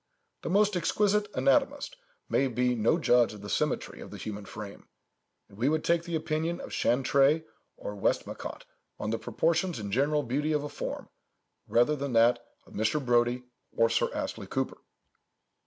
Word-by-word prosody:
The -, -, -4 dB
most 205 Hz, +2 st, +3 dB
exquisite 205 Hz, +3 st, +2 dB
anatomist 280 Hz, 0 st, +2 dB, 0.3 s
may 135 Hz, -, +2 dB
be 125 Hz, 0 st, +1 dB
no 115 Hz, +7 st, +2 dB
judge 120 Hz, -8 st, +3 dB
of 105 Hz, -, -12 dB
the 105 Hz, -, -6 dB
symmetry 150 Hz, -2 st, -1 dB
of -, -, -9 dB
the -, -, -8 dB
human 105 Hz, -1 st, -6 dB
frame: 100 Hz, +1 st, -9 dB, 0.6 s
and 100 Hz, -, -17 dB
we 130 Hz, +4 st, +3 dB
would 155 Hz, 0 st, 0 dB
take 170 Hz, 0 st, +2 dB
the 170 Hz, -1 st, -3 dB
opinion 160 Hz, +2 st, -1 dB
of -, -, -8 dB
Chantrey 135 Hz, +5 st, +3 dB, 0.3 s
or 105 Hz, -, -6 dB
Westmacott 100 Hz, -, -2 dB, 0.3 s
on 105 Hz, +1 st, -2 dB
the 115 Hz, -, -1 dB
proportions 170 Hz, +6 st, 0 dB
and 100 Hz, -3 st, -5 dB
general 145 Hz, +4 st, +2 dB
beauty 145 Hz, +5 st, 0 dB
of 150 Hz, -1 st, 0 dB
a 145 Hz, -, -4 dB
form, -, -, -5 dB, 0.6 s
rather 120 Hz, +6 st, +3 dB
than 140 Hz, -2 st, -3 dB
that 120 Hz, +1 st, +4 dB, 0.2 s
of -, -, -17 dB
Mr. 110 Hz, +7 st, +1 dB
Brodie 125 Hz, -1 st, +2 dB, 0.3 s
or 115 Hz, 0 st, +4 dB
Sir -, -, +2 dB
Astley -, -, -4 dB
Cooper. -, -, -2 dB
135 Hz, 170 wpm, -29 LUFS, 115-160 Hz, 0.6 s, that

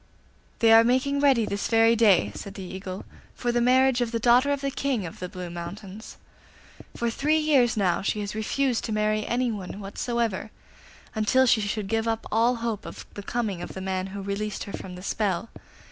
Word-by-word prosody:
'They 225 Hz, -1 st, +4 dB
are 225 Hz, 0 st, +8 dB
making 260 Hz, +4 st, +1 dB
ready 270 Hz, -6 st, +4 dB
this 200 Hz, -1 st, -2 dB
very 225 Hz, 0 st, +4 dB
day,' 200 Hz, -, +4 dB
said 200 Hz, 0 st, -8 dB
the 195 Hz, -, -7 dB
Eagle, 190 Hz, +1 st, -7 dB, 0.3 s
'for 240 Hz, -, -1 dB
the 240 Hz, 0 st, +1 dB
marriage 255 Hz, +1 st, +4 dB
of 235 Hz, -2 st, -1 dB
the 230 Hz, -, 0 dB
daughter 245 Hz, +4 st, +4 dB
of 285 Hz, -1 st, -1 dB
the 275 Hz, -1 st, -1 dB
King 265 Hz, -7 st, -1 dB
of 165 Hz, -, -9 dB
the 180 Hz, -, -5 dB
Blue 180 Hz, 0 st, -7 dB
Mountains. 190 Hz, +5 st, -8 dB, 0.8 s
For 235 Hz, -1 st, 0 dB
three 300 Hz, +6 st, +1 dB
years 275 Hz, -7 st, +3 dB
now 185 Hz, -4 st, +1 dB
she 200 Hz, +2 st, -1 dB
has 205 Hz, 0 st, -4 dB
refused 235 Hz, +3 st, 0 dB
to 225 Hz, -, -4 dB
marry 215 Hz, 0 st, 0 dB
anyone 220 Hz, -6 st, -2 dB
whatsoever, 220 Hz, +1 st, -2 dB, 0.6 s
until 245 Hz, +4 st, +3 dB
she 235 Hz, -3 st, +4 dB
should 205 Hz, 0 st, -2 dB
give 225 Hz, +2 st, 0 dB
up 225 Hz, 0 st, -1 dB
all 230 Hz, +3 st, +3 dB
hope 230 Hz, -3 st, -4 dB
of -, -, -9 dB
the 205 Hz, -, -7 dB
coming 205 Hz, -4 st, -3 dB
of -, -, -7 dB
the -, -, -5 dB
man 190 Hz, 0 st, -2 dB
who 195 Hz, +1 st, -7 dB
released 200 Hz, +1 st, -3 dB
her 200 Hz, -, -9 dB
from 180 Hz, -1 st, -7 dB
the 180 Hz, -, -10 dB
spell. 200 Hz, +1 st, -1 dB
220 Hz, 200 wpm, -26 LUFS, 195-240 Hz, 0.8 s, are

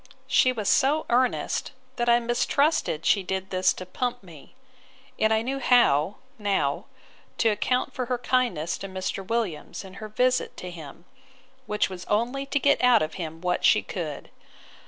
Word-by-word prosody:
She 260 Hz, -1 st, +4 dB
was 215 Hz, -5 st, -4 dB
so 295 Hz, +4 st, +3 dB
earnest, 250 Hz, +3 st, 0 dB, 0.2 s
that 240 Hz, 0 st, +1 dB
I 235 Hz, 0 st, +6 dB
mistrusted 240 Hz, -, 0 dB
she 200 Hz, -, +4 dB
did 190 Hz, +1 st, -4 dB
this 185 Hz, 0 st, +3 dB
to 185 Hz, -, -8 dB
pump 245 Hz, +5 st, -3 dB
me; 165 Hz, -, -15 dB, 0.6 s
and 220 Hz, -, +3 dB
I 220 Hz, 0 st, +2 dB
knew 270 Hz, +3 st, -3 dB
how, 205 Hz, -, +3 dB, 0.2 s
now, 195 Hz, -9 st, 0 dB, 0.5 s
to 230 Hz, -, +3 dB
account 250 Hz, +4 st, 0 dB
for 255 Hz, -2 st, -3 dB
her 250 Hz, 0 st, 0 dB
kindness 235 Hz, -10 st, 0 dB
to 195 Hz, -, -6 dB
Mr. 190 Hz, 0 st, -4 dB
Williams 200 Hz, -4 st, -3 dB
in 190 Hz, -, -11 dB
her 215 Hz, -, -6 dB
visit 250 Hz, +3 st, 0 dB
to 180 Hz, -, -7 dB
him; 165 Hz, 0 st, -11 dB, 0.6 s
which 210 Hz, 0 st, +1 dB
was 185 Hz, -2 st, -8 dB
only 245 Hz, +6 st, -1 dB
to 280 Hz, -, 0 dB
get 280 Hz, -1 st, +2 dB
out 245 Hz, -5 st, +5 dB
of 155 Hz, +1 st, -4 dB
him 165 Hz, 0 st, -6 dB
what 180 Hz, 0 st, -1 dB
she -, -, +5 dB
could. -, -, -6 dB
220 Hz, 170 wpm, -26 LUFS, 185-250 Hz, 0.6 s, I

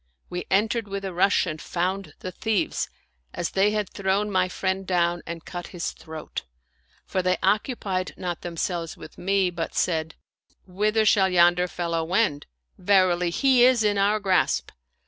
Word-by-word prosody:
We 180 Hz, 0 st, -4 dB
entered 215 Hz, +3 st, +1 dB
with 200 Hz, 0 st, -4 dB
a 190 Hz, -, -4 dB
rush 190 Hz, +3 st, +3 dB
and 155 Hz, -3 st, -5 dB
found 185 Hz, -2 st, -2 dB
the 185 Hz, -, -5 dB
thieves, 215 Hz, +2 st, -1 dB, 0.5 s
as 175 Hz, -, -2 dB
they 195 Hz, +2 st, +3 dB
had 210 Hz, -1 st, -1 dB
thrown 200 Hz, +1 st, 0 dB
my 185 Hz, -1 st, +2 dB
friend 190 Hz, +1 st, -2 dB
down 175 Hz, -1 st, +1 dB
and 170 Hz, -1 st, -6 dB
cut 175 Hz, -1 st, -6 dB
his 170 Hz, -, -2 dB
throat; 160 Hz, -1 st, -7 dB, 0.6 s
for 185 Hz, -, -1 dB
they 185 Hz, 0 st, +1 dB
occupied 195 Hz, -2 st, 0 dB
not 175 Hz, -2 st, -4 dB
themselves 170 Hz, -1 st, -3 dB
with -, -, -12 dB
me, 195 Hz, -1 st, +1 dB
but 170 Hz, -2 st, -4 dB
said, 160 Hz, -2 st, 0 dB, 0.3 s
" -, -, -39 dB
Whither 210 Hz, +4 st, +1 dB
shall 195 Hz, -3 st, +4 dB
yonder 175 Hz, 0 st, +4 dB
fellow 170 Hz, -2 st, -2 dB
wend? 175 Hz, -4 st, 0 dB, 0.3 s
Verily, 180 Hz, -2 st, +3 dB
he 255 Hz, +6 st, +4 dB
is 250 Hz, -2 st, +5 dB
in 205 Hz, -1 st, +2 dB
our 205 Hz, +2 st, +3 dB
grasp." 190 Hz, -3 st, +1 dB
185 Hz, 165 wpm, -25 LUFS, 175-200 Hz, 0.6 s, is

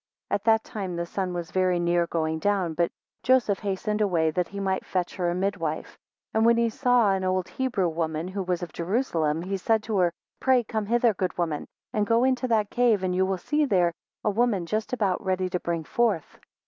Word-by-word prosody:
7 -, -, -4 dB
At 200 Hz, -, -3 dB
that 220 Hz, -1 st, +4 dB
time 190 Hz, -4 st, -5 dB
the 170 Hz, 0 st, -2 dB
sun 185 Hz, +1 st, -3 dB
was 175 Hz, -1 st, -5 dB
very 185 Hz, -1 st, +2 dB
near 175 Hz, 0 st, +1 dB
going 160 Hz, -1 st, -1 dB
down. 195 Hz, -2 st, +1 dB
8 -, -, -8 dB
But 170 Hz, 0 st, +1 dB, 0.3 s
Joseph 250 Hz, -6 st, +3 dB
hastened 210 Hz, +2 st, -2 dB
away, 170 Hz, -6 st, +2 dB
that 180 Hz, +2 st, -1 dB
he 200 Hz, -, -7 dB
might 190 Hz, -1 st, -1 dB
fetch 180 Hz, -2 st, -2 dB
her 175 Hz, -2 st, 0 dB
a 175 Hz, -, -1 dB
midwife; 170 Hz, -5 st, -2 dB, 0.4 s
and 220 Hz, -, +2 dB
when 235 Hz, 0 st, +5 dB
he 235 Hz, 0 st, +2 dB
saw 245 Hz, -3 st, +3 dB
an 190 Hz, -1 st, 0 dB
old 185 Hz, -1 st, 0 dB
Hebrew 250 Hz, -9 st, -1 dB
woman 160 Hz, 0 st, -2 dB
who 195 Hz, +1 st, -4 dB
was 180 Hz, -1 st, -2 dB
of 170 Hz, -, -7 dB
Jerusalem, 170 Hz, -, 0 dB
he 195 Hz, +2 st, -2 dB
said 220 Hz, +3 st, +1 dB
to 215 Hz, -3 st, -1 dB
her, 175 Hz, -2 st, +3 dB, 0.3 s
Pray 260 Hz, -2 st, +3 dB
come 215 Hz, -2 st, -3 dB
hither, 235 Hz, 0 st, +3 dB
good 185 Hz, -1 st, -3 dB
woman, 165 Hz, -4 st, -2 dB, 0.3 s
and 210 Hz, -3 st, +1 dB
go 230 Hz, +2 st, +3 dB
into 260 Hz, 0 st, +1 dB
that 215 Hz, -3 st, +1 dB
cave, 235 Hz, -5 st, +3 dB
and 185 Hz, -1 st, 0 dB
you 190 Hz, +1 st, +2 dB
will 190 Hz, -1 st, 0 dB, 0.3 s
there 180 Hz, -6 st, +3 dB
see -, -, -30 dB, 0.3 s
a 210 Hz, -, +3 dB
woman 210 Hz, -4 st, +1 dB
just 215 Hz, +5 st, -2 dB, 0.3 s
ready 185 Hz, -1 st, -1 dB
to 180 Hz, -, 0 dB
bring 170 Hz, -2 st, -2 dB
forth. 210 Hz, -3 st, -1 dB
190 Hz, 220 wpm, -26 LUFS, 175-220 Hz, 0.4 s, when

